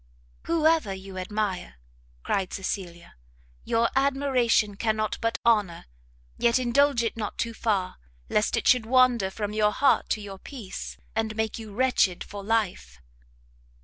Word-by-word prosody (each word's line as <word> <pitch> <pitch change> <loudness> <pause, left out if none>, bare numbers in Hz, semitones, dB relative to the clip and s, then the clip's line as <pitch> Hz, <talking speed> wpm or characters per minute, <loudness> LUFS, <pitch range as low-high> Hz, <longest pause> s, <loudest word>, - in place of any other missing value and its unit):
"Whoever 320 -7 +2
you 190 0 -8
admire," 190 - -3 0.5
cried 190 -2 -1
Cecilia, 185 -3 -5 0.5
"your 230 +1 +2
admiration 265 -6 +2
cannot 215 0 -1
but 230 0 0
honour: 210 -7 +2 0.5
yet 235 0 +3
indulge 255 0 +2
it 230 - -2
not 215 -2 -5
too 230 0 -2
far, 205 -5 -1 0.3
lest 210 - +1
it - - -1
should 245 -3 +4
wander 250 -5 +4
from 205 +1 -4
your 210 -1 +2
heart 280 +6 +2
to - - -9
your 195 -2 -8
peace, 230 -7 -8 0.2
and 220 -1 -1
make 220 +1 -2
you 220 -2 -9
wretched 245 -7 +2
for 205 -1 -8
life." 195 - -1
220 Hz, 140 wpm, -26 LUFS, 195-240 Hz, 0.5 s, should